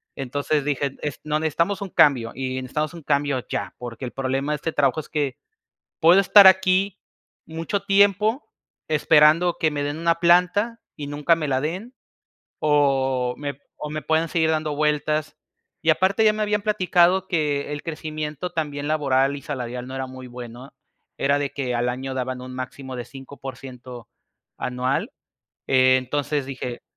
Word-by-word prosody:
entonces 145 +2 -1
dije: 140 -1 -1
"Est 150 -2 -4
no, 150 0 0
necesitamos 170 +6 0
un 195 - -4
cambio 130 -9 +3
y 130 -1 -3
necesitamos 150 +5 -3
un 165 -3 -10
cambio 140 -3 0
ya, - - -4
porque, 120 0 -7
el 120 - -6
problema 135 +2 -1
de - - -1
este 160 +3 -3
trabajo 145 +1 +1
es - - -17
que, 145 -4 -1 0.7
puedo 175 +4 +7
estar 200 0 +8
aquí 190 +1 +4 0.5
mucho 165 +5 -3
tiempo 205 +5 +2 0.4
esperando 155 +3 +4
que 155 -1 +1
me 145 -1 -2
den 145 +2 -3
una 170 0 +1
planta 180 +7 +3 0.2
y 145 -1 -6
nunca 150 +3 +2
me 155 -3 -3
la 130 -1 +1
den, 185 - -4 0.7
o 135 -4 +2
me 140 -1 -5 0.2
o 150 - -6
me 155 0 -4
puedan 160 +1 +1
seguir 160 -2 +1
dando 155 -1 -1
vueltas", 150 0 0 0.4
y, 160 - +4
aparte, 190 +7 +2
ya 215 - +5
me 215 - -3
habían 210 -1 0
platicado 185 -2 +2
que 150 -5 -1
el 145 - -5
crecimiento 155 0 -5
también 145 -3 -3
laboral 140 -2 +1
y 140 - -8
salarial 125 -3 -5
no 130 - -8
era 130 -1 -3
muy 130 0 -10
bueno, 125 +1 -10 0.4
era 140 +1 +2
de 145 -1 -2
que 130 -3 -3
al 120 +1 0
año 130 +2 -4
daban 130 0 -3
un 130 0 -8
máximo 130 +1 -6
de 120 -1 -5
5% 130 -3 -10 0.5
anual, 125 +1 -2 0.6
entonces 130 +2 +2
dije, 125 -2 -6
145 Hz, 165 wpm, -23 LUFS, 130-165 Hz, 0.7 s, estar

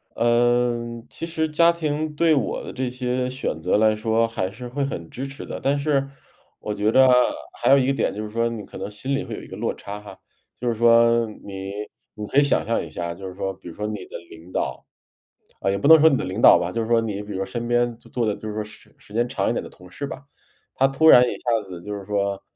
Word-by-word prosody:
呃， 120 0 +1
其 - - -6
实 160 -1 -1
家 170 +2 +4
庭 155 -2 -2
对 165 +1 +4
我 140 - -1
的 - - -8
这 130 -1 -2
些 125 0 -2
选 130 - -4
择 90 +4 +2
来 110 0 +4
说 110 +1 +1
还 95 -5 -3
是 120 +5 -9
会 140 +4 -2
很 85 - -4
支 135 +3 -5
持 135 0 -9
的， - - -6
但 140 +1 +1
是 140 -1 +1 0.5
我 105 - -4
觉 105 +1 +1
得 130 +2 +6 0.5
还 120 - +3
有 140 - +8
一 130 - +2
个 135 - +2
点 - - 0
就 105 - -4
是 105 - -6
说 115 +2 0
你 115 -3 -6
可 - - -11
能 - - -5
心 130 +7 -3
里 135 - -2
会 - - -6
有 - - -8
一 - - -12
个 - - -9
落 - - -1
差 100 +1 -8
哈。 105 -2 -12 0.4
就 125 - -3
是 120 - +2
说 115 0 +4 0.2
你 95 -1 -6 0.4
你 105 - -5
可 135 - +3
以 - - +5
想 140 - +1
象 115 - 0
一 80 - -8
下 85 +3 -4
啊， - - -3
就 95 +3 -8
是 90 - -9
说 95 0 -3
比 95 -1 -15
如 85 - -9
说 105 - -4
你 105 -3 -4
的 - - -8
领 80 +2 -13
导 - - -3 0.8
呃， - - +1
也 100 - +1
不 100 - -4
能 160 +2 +9
说 160 - +7
你 140 - +2
的 - - -2
领 95 +5 -4
导 - - +9
吧， 85 - -2
就 115 - -2
是 110 - -3
说 115 0 +3
你 105 -3 -3
比 105 - -9
如 - - -4
说 95 - -2
身 120 +3 -5
边 120 -1 +1
做 - - -19
做 120 -2 -1
的 105 - +1
就 110 - -8
是 105 - -4
说 110 - -2
时 105 - -14
时 105 - -17
间 120 +2 +1
长 - - -1
一 - - +1
点 - - -1
的 - - -9
同 90 0 -16
事 140 - -5
吧， 140 - -8 0.5
他 135 - +4
突 135 +4 +2
然 125 - +9
一 - - -2
下 115 -2 0
子 90 -2 -8
就 105 +3 -6
是 100 -1 -6
说 100 -1 -1
115 Hz, 300 characters per minute, -23 LUFS, 105-130 Hz, 0.8 s, 能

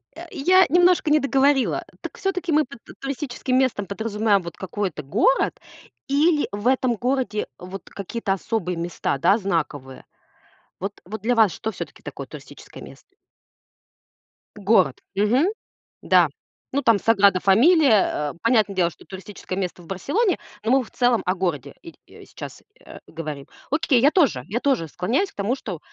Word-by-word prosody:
Э, - - -9
я 370 +6 +4
немножко 355 -1 +4
не 305 - +5
договорила. 275 -1 +2 0.2
Так - - -8
всё-таки 365 -3 -2
мы 305 -1 +3
под 240 -2 -14
т - - -13
туристическим 265 -2 -2
местом 255 -6 +1
подразумеваем 210 -1 0
вот 170 -1 -9
какой-то 190 -5 -4
город 230 - +1 0.5
или 295 +2 +2
в 205 +4 -3
этом 255 -2 +2
городе 250 -2 -1
вот 185 +1 -9
какие-то 200 0 -3
особые 190 -2 -2
места, 170 -4 -2
да, 190 +9 +3
знаковые? 150 - -3 0.7
Вот 195 +2 -5
вот 215 +2 -7
для 245 +2 +1
вас 220 -5 +5
что 220 - -4
всё-таки - - -9
такое - - -7
туристическое - - -12
место? 385 - -15 1.4
Город. 200 -1 +2
Мгм. 225 - +2 0.6
Да. - - +4 0.4
Ну, 280 +2 0
там 230 -5 +4
"Саграда 200 -4 +4
Фамилия", 220 - +4
э, - - -13
понятное 220 -4 +2
дело, 175 -2 +2
что - - -17
туристическое 190 0 -8
место 180 -2 -3
в 170 - -16
Барселоне. 330 - 0 0.2
Но 225 - 0
мы 265 -1 +4
в - - -16
целом 245 -2 +2
о 185 - +2
городе 155 -7 -3
иль 335 -2 -12 0.3
сейчас, - - -10 0.2
э, - - -12
говорим. 150 -4 -7 0.2
Окей, 290 -5 +2
я 285 +3 +5
тоже. 260 - +2
Я 230 +5 -2
тоже 255 - 0
склоняюсь 250 - -1
к - - -34
тому, 205 +6 -1
что, 185 - -7
220 Hz, 160 wpm, -23 LUFS, 190-275 Hz, 1.4 s, не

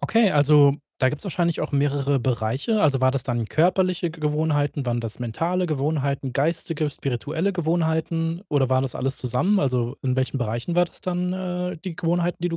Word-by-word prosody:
okay, 225 -3 +3
also, 145 -1 +5 0.2
da 130 - +3
gibt's 150 +6 -5
wahrscheinlich 175 -3 0
auch 155 - -3
mehrere 140 0 +1
Bereiche. 130 - 0
Also, 140 -4 +3
war 130 0 +4
das 135 -1 -2
dann 120 -3 -2
körperliche 180 - +1
Ge 165 - -13
Gewohnheiten, 150 -2 0
waren 120 -1 -1
das 115 0 -5
mentale 165 +10 -1
Gewohnheiten, 140 -3 -1
geistige, 155 +2 -1
spirituelle 145 - -2
Gewohnheiten 165 0 -1
oder 140 -3 +2
waren 130 0 +2
das 135 -2 -3
alles 135 +1 -2
zusammen? 130 - +1
Also, 125 -1 0
in 130 -1 0
welchen 130 +1 0
Bereichen 120 +7 -2
war 175 0 +4
das 170 - -14
dann, 180 0 -2
äh, 180 -1 -3
die 180 -4 -5
Gewohnheiten, 175 +1 0
die 175 - +1
du 165 - -3
150 Hz, 185 wpm, -24 LUFS, 130-175 Hz, 0.2 s, also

